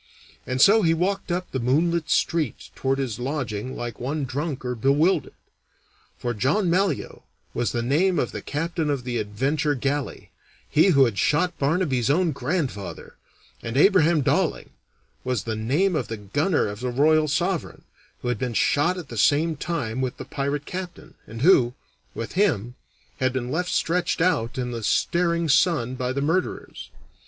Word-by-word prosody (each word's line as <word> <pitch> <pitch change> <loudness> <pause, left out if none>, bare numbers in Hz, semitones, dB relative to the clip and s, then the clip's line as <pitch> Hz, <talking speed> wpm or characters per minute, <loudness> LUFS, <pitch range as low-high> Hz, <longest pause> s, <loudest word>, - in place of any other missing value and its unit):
And 130 0 -2
so 215 +10 +6
he 165 -3 +3
walked 190 +2 -1
up 180 +1 -3
the 130 - -2
moonlit 160 +7 +1
street 155 -8 0
toward 135 0 -1
his 125 -6 -3
lodging 130 -3 -3
like 120 -1 -5
one 140 +3 -2
drunk 140 +1 -4
or 125 - -1
bewildered; 140 - +1 0.8
for 120 -1 -2
"John 155 - +1
Malyoe" 185 -4 0 0.3
was 120 0 -1
the 120 - -2
name 170 +9 +2
of 125 - 0
the - - -6
captain 160 +1 -2
of 140 -4 -1
the 120 -2 -2
Adventure 135 +8 0
galley 140 +2 -3 0.4
he 160 - +4
who 140 -8 +5
had 105 -5 -2
shot 175 +9 +1
Barnaby's 140 -5 +1
own 170 +3 +2
grandfather 135 - -4 0.5
and 115 +2 -4
"Abraham 170 -3 +4
Dawling" - - 0 0.5
was 125 -4 -1
the 110 -1 -3
name 145 - +1
of - - -1
the 115 - -5
gunner 145 - 0
of 105 0 -6
the 125 +1 -2
Royal 155 +5 +3
Sovereign 175 +3 -2 0.4
who 120 - -1
had 120 -4 -1
been 125 -3 -3
shot 170 +11 +2
at 165 -6 -8
the 115 - -7
same 155 +7 +3
time 130 -7 -3
with 130 -1 -3
the - - -7
pirate 140 +1 -3
captain, 180 -1 -7
and 115 +3 -6
who, 130 -9 +5 0.4
with 115 - -5
him, 125 - +1 0.5
had 130 0 +2
been 125 -1 -3
left 180 +4 -1
stretched 175 +2 0
out 130 -10 +1
in 125 -1 -2
the 115 -1 -4
staring 170 +9 +1
sun 145 -5 +2
by 125 0 -2
the 140 +2 -2
murderers. 165 +6 -2
145 Hz, 170 wpm, -24 LUFS, 125-170 Hz, 0.8 s, so